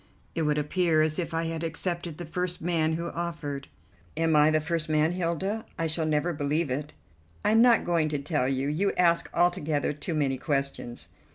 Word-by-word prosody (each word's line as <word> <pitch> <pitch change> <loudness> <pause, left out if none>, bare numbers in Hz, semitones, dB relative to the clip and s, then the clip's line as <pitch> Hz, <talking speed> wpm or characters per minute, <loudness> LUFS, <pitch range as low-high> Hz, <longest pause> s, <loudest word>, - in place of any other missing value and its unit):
It 165 - -1
would 150 -1 +1
appear 155 +1 +2
as 155 +1 0
if 175 - -2
I 165 0 -1
had 165 0 -3
accepted 170 0 -3
the 175 - -6
first 180 +2 -3
man 160 -2 +1
who 170 +1 -3
offered." 150 -5 -4 0.5
"Am 165 -1 +2
I 150 +1 +6
the 155 0 +3
first 160 0 -1
man, 155 +1 +3
Hilda? 185 +5 -1
I 165 - -1
shall 160 0 -1
never 155 +3 +1
believe 145 0 -1
it." 145 +3 -3 0.5
"I'm 220 +1 +5
not 240 -1 +5
going 165 -3 +2
to 150 - -1
tell 140 -2 0
you. 135 +1 0
You 175 +7 +1
ask 170 -1 +2
altogether 160 -5 +1
too 150 +3 -4
many 135 -3 0
questions." 140 -5 -2
160 Hz, 190 wpm, -27 LUFS, 150-170 Hz, 0.5 s, I